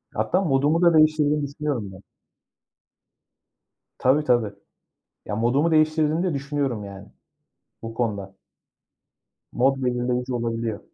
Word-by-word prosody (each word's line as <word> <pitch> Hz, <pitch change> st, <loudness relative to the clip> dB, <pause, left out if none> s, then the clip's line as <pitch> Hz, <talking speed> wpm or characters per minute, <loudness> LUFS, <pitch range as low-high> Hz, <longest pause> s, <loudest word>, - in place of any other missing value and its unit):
Hatta 185 Hz, -, +1 dB
modumu 150 Hz, 0 st, +2 dB
da 170 Hz, -1 st, +5 dB
değiştirdiğini 155 Hz, -1 st, +3 dB
düşünüyorum 140 Hz, -8 st, -4 dB
ben. 95 Hz, 0 st, -13 dB, 2.0 s
Tabii, 135 Hz, +4 st, +2 dB
tabii. 120 Hz, -7 st, +1 dB, 0.7 s
Ya 105 Hz, -, -4 dB
modumu 135 Hz, +9 st, +1 dB
değiştirdiğini 155 Hz, +1 st, +2 dB
de 180 Hz, -3 st, 0 dB
düşünüyorum 140 Hz, -5 st, -2 dB
yani. 100 Hz, 0 st, -11 dB, 0.7 s
Bu 115 Hz, 0 st, -7 dB
konuda. 100 Hz, -5 st, -3 dB, 1.2 s
Mod 135 Hz, +2 st, +1 dB
belirleyici 125 Hz, 0 st, -1 dB
olabiliyor. 115 Hz, -2 st, -2 dB
130 Hz, 105 wpm, -23 LUFS, 115-150 Hz, 2.0 s, da